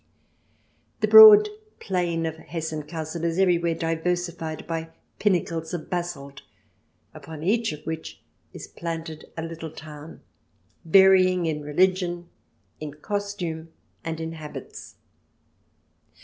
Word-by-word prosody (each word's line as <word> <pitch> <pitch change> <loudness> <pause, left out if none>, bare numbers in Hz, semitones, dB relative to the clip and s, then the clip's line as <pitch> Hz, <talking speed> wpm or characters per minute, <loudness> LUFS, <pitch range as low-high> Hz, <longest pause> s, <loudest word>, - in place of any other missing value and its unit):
The - - +2
broad 430 -1 +10 0.3
plain 175 -4 -1
of 160 0 -4
Hessen 160 -1 -5
Cassel 160 0 -5
is 170 0 -1
everywhere 170 -3 +2
diversified 165 0 -3
by 165 -1 -4 0.3
pinnacles 170 -4 0
of 160 - -8
basalt, 170 -6 -4 0.7
upon 160 -1 -9
each 220 +4 +1
of 150 0 -9
which 160 0 -6 0.3
is - - -9
planted 165 -2 -6
a 160 - -3
little 165 0 -6
town, 155 0 -11 0.6
varying 185 0 +5
in 155 -2 -2
religion, 175 +3 0 0.5
in 150 -1 -7
costume, 175 -3 -4 0.3
and 165 0 -4
in 160 0 -4
habits. 155 -2 -9
165 Hz, 110 wpm, -25 LUFS, 160-180 Hz, 0.7 s, broad